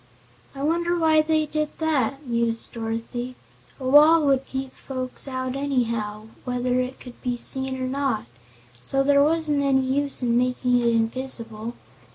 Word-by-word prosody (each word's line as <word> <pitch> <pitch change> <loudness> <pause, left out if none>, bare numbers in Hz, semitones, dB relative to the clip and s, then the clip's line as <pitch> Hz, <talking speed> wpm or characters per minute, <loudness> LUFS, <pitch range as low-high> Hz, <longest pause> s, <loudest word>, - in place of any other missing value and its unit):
"I 275 - -5
wonder 340 +3 +1
why 315 -2 +4
they 310 0 +1
did 305 0 -3
that?" 285 -3 0
mused 235 -2 -1
Dorothy. 230 +2 -4 0.4
"A 260 - -4
wall 300 +3 +7
would 270 -1 +2
keep 265 0 -5
folks 255 0 -4
out 255 -1 -3
anyhow, 230 -6 -1 0.2
whether 250 0 0
it 255 +1 -3
could 250 -2 -12
be 245 -2 -2
seen 265 +1 -1
or 255 - -2
not, 270 - -1 0.6
so 270 - 0
there 280 0 +4
wasn't 305 -1 +2
any 270 -1 +3
use 270 +1 +1
making 245 +1 +2
it 235 - +1
invisible. 230 -1 -1
260 Hz, 150 wpm, -24 LUFS, 240-285 Hz, 0.6 s, wall